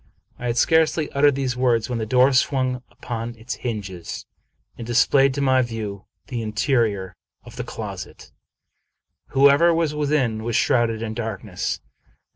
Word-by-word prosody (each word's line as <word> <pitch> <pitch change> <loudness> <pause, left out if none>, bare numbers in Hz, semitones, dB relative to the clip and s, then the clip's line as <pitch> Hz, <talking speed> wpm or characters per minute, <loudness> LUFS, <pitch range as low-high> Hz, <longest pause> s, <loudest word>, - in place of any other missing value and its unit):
I 125 - -4
had 120 0 -1
scarcely 160 +1 +3
uttered 140 0 +4
these 130 -2 -1
words, 120 -3 +1
when 120 -2 -3
the 110 - -3
door 130 +4 +4
swung 130 -1 +1
upon 120 -1 -6
its 115 +3 -6
hinges 100 -8 -5 0.5
and 115 - -8
displayed 135 +3 +4
to 140 - -1
my 130 -1 +4
view 110 -5 -5 0.2
the 120 -3 -4
interior 110 -3 0 0.3
of - - -13
the - - -4
closet. - - -8 1.0
Whoever 140 +5 +5
was 165 -2 0
within 140 -7 0
was 115 0 -2
shrouded 115 -4 +2
in 110 -1 -3
darkness. 110 -4 -4
120 Hz, 145 wpm, -23 LUFS, 110-135 Hz, 1.0 s, Whoever